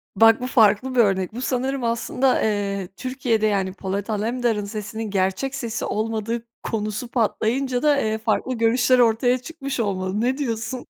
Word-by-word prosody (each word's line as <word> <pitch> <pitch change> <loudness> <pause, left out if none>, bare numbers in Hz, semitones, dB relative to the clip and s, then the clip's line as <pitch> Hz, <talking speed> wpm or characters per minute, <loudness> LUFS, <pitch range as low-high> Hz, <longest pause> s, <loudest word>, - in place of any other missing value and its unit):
Bak 225 +3 +6
bu 250 - -2
farklı 250 +1 +3
bir - - +2
örnek. 195 -2 +2
Bu 245 - -5
sanırım 260 0 -1
aslında, 235 +3 +1
eee, 200 -3 -1
Türkiye'de, 250 -4 0
yani, 195 -3 0
Polat 200 +2 -4
Alemdar'ın 220 0 0
sesinin 215 +1 -5
gerçek 195 +8 0
sesi 235 -5 -3
olmadığı 225 +1 -2 0.2
konusu 215 +2 -3
patlayınca 245 +2 0
da, 295 -1 +4
eee, 220 0 0
farklı 220 +3 -1
görüşler 240 +2 +3
ortaya 245 +2 +3
çıkmış 275 -1 -6
olmalı, 195 -1 -1
ne 255 +3 +1
diyorsun? 240 -2 -3
225 Hz, 155 wpm, -23 LUFS, 210-255 Hz, 0.2 s, Bak